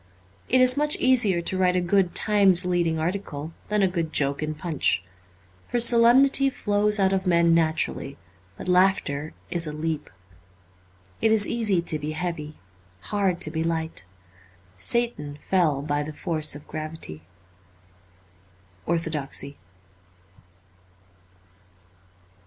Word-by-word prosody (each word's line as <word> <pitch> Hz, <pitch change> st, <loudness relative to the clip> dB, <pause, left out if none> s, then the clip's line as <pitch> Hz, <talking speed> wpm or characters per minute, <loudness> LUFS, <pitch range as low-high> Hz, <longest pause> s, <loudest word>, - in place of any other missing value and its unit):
It 255 Hz, +1 st, +4 dB
is 255 Hz, +1 st, +5 dB
much 300 Hz, 0 st, 0 dB
easier 225 Hz, -9 st, +2 dB
to 190 Hz, -, -1 dB
write 180 Hz, -1 st, +2 dB
a -, -, +2 dB
good 180 Hz, 0 st, +1 dB
Times 195 Hz, -4 st, +4 dB
leading 175 Hz, -3 st, 0 dB
article 160 Hz, -3 st, -4 dB, 0.2 s
than 210 Hz, -1 st, +1 dB
a -, -, +4 dB
good 170 Hz, -3 st, -3 dB
joke 140 Hz, -1 st, -1 dB
in 155 Hz, 0 st, -3 dB
Punch. 150 Hz, -, 0 dB, 0.6 s
For 245 Hz, -, -1 dB
solemnity 245 Hz, +4 st, +5 dB
flows 210 Hz, -3 st, +1 dB
out 190 Hz, 0 st, +2 dB
of 190 Hz, 0 st, -1 dB
men 170 Hz, -1 st, +3 dB
naturally, 160 Hz, -4 st, 0 dB, 0.4 s
but -, -, -8 dB
laughter 180 Hz, -5 st, +1 dB, 0.2 s
is 170 Hz, -2 st, 0 dB
a -, -, -4 dB
leap. 155 Hz, 0 st, -4 dB, 1.1 s
It 220 Hz, -, +3 dB
is 215 Hz, -2 st, +5 dB
easy 210 Hz, -7 st, 0 dB
to 155 Hz, -3 st, -1 dB
be 150 Hz, +1 st, -5 dB
heavy: 155 Hz, -2 st, -5 dB, 0.5 s
hard 195 Hz, -4 st, 0 dB
to 155 Hz, -, 0 dB
be 160 Hz, 0 st, -2 dB
light. 160 Hz, -, -3 dB, 0.7 s
Satan 150 Hz, -, 0 dB
fell 155 Hz, -7 st, 0 dB
by 145 Hz, 0 st, -1 dB
the 150 Hz, +1 st, -6 dB
force 155 Hz, -3 st, 0 dB
of 145 Hz, -, -12 dB
gravity. 155 Hz, -, -7 dB, 0.8 s
' 90 Hz, 0 st, -33 dB
Orthodoxy.' 150 Hz, -4 st, -1 dB
170 Hz, 130 wpm, -24 LUFS, 150-200 Hz, 1.1 s, is